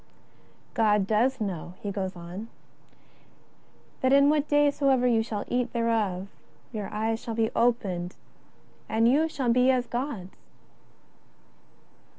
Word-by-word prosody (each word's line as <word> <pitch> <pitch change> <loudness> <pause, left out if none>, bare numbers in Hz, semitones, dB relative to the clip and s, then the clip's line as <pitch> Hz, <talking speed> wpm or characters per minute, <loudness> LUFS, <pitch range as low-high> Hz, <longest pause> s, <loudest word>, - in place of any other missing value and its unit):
" - - -31 0.3
God 210 -3 +3
doth 235 +6 +1
know," 180 -4 -4
he 205 - -4
goes 190 -1 -3
on, 175 +2 -8
^^ 225 - -7 1.5
that 260 - +2
in 280 +1 +6
what 300 -1 +1
day 290 0 +4
soever 270 -3 +2
you 235 -2 +3
shall 220 -2 -4
eat 245 -1 -1
thereof 220 -6 0 0.4
your 210 -4 -5
eyes 225 +1 -1
shall 230 -2 -5
be 225 -1 +1
opened 195 -7 0 0.7
and 225 +1 +3
you 300 +6 +3
shall 255 -6 0
be 250 +1 +4
as 255 -2 +2
Gods." 240 -7 -4
230 Hz, 140 wpm, -27 LUFS, 205-255 Hz, 1.5 s, in